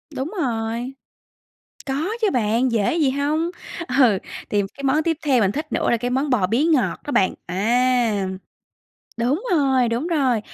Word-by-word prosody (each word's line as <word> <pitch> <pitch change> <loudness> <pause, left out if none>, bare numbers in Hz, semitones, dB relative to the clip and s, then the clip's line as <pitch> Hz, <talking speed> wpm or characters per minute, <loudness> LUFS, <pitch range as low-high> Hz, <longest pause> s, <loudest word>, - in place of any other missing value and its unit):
Đúng 265 +6 -3
rồi. 235 0 -2 0.9
Có 285 +7 -1
chứ 430 - +3
bạn, 240 +1 +1
dễ 220 +4 +1
gì 305 -5 +2
hông. 295 +5 0 0.4
Ừ, 250 - +4 0.3
thì 205 - +2
cái 280 - -11
món 285 +3 +2
tiếp 325 -1 0
theo 265 -4 +4
mình 195 -2 +2
thích 300 +5 -5
nữa - - 0
là 235 - +3
cái 245 +2 -3
món 265 +4 0
bò 220 -8 +2
bía 230 +9 +1
ngọt 315 -5 +1
đó 290 - -5
bạn. 190 -8 +2
À, 230 +2 +1 0.9
đúng 260 - 0
rồi, 265 -6 +3
đúng 235 +7 -1
rồi. 270 -9 +1
255 Hz, 170 wpm, -22 LUFS, 230-290 Hz, 0.9 s, Ừ